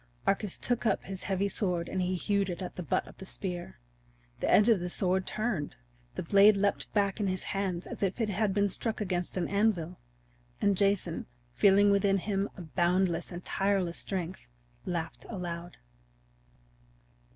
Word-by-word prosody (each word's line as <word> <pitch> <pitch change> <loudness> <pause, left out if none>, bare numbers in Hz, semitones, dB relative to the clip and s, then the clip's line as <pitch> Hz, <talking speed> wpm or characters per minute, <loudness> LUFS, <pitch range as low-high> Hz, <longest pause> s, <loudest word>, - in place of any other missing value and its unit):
Arcas 200 -1 +1
took 245 -1 -1
up 220 -4 +1
his 190 -1 -6
heavy 195 0 +1
sword 180 -4 0
and 190 - -2
he 180 +1 0
hewed 200 +1 0
at 180 +1 -5
the - - -4
butt 165 - -1
of - - -13
the 190 - -8
spear. 175 - -5 0.6
The - - -1
edge 210 - +6
of 225 -5 +5
the 180 +1 -3
sword 185 +1 0
turned. 215 -10 -2 0.4
The - - -3
blade 200 +4 +6
leaped 200 0 0
back 200 0 +1
in 205 - +1
his 185 0 -2
hand 190 -3 -2
as - - -8
if 195 +3 0
it 225 -2 +1
had 205 +1 +1
been 205 +1 +2
struck 220 +3 -2
against 180 -3 -2
an 175 - 0
anvil. 195 -4 0 0.6
And 200 -1 +3
Jason, 200 - 0 0.3
feeling 200 - +5
within 200 0 +3
him 195 +1 -1
a 180 - -7
boundless 175 +1 +1
and 175 0 -7
tireless 195 -3 0
strength, 185 - -4 0.4
laughed 170 -2 -4
aloud. 175 -4 -5
190 Hz, 170 wpm, -30 LUFS, 180-200 Hz, 0.6 s, edge